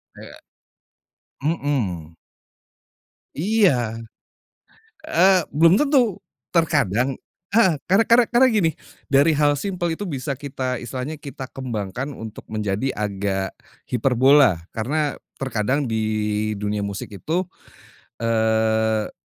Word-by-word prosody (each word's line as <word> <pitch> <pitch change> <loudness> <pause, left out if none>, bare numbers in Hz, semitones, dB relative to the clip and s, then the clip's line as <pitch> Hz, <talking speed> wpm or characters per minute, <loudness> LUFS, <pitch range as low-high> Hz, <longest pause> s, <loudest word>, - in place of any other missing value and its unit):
He - - -13 1.0
mhm. 115 - -2 1.2
Iya. 150 - +2 1.1
Eee, 195 -12 +4
belum 165 +4 +5
tentu, 265 - +2 0.3
terkadang 135 - +1 0.3
heeh, 195 -6 +4
karena 195 +5 +4
karena 235 +1 +6
karena 250 +2 +5
gini, 195 -7 +3 0.4
dari 145 +4 +5
hal 145 0 +3
simpel 175 -1 -2
itu 205 - -5
bisa 140 -4 -3
kita 130 -3 -3
istilahnya 130 +5 -5
kita 135 -3 -8
kembangkan 125 +1 -5
untuk 110 -2 -9
menjadi 105 +4 -2
agak 100 -2 -2 0.4
hiperbola. 130 - +4
Karena 145 +6 -2 0.2
terkadang 130 +2 -1
di 110 - 0 0.6
dunia 105 0 -2
musik 100 -1 -6
itu, 160 - -1 0.8
eee, 110 -1 +1
135 Hz, 100 wpm, -22 LUFS, 110-165 Hz, 1.2 s, karena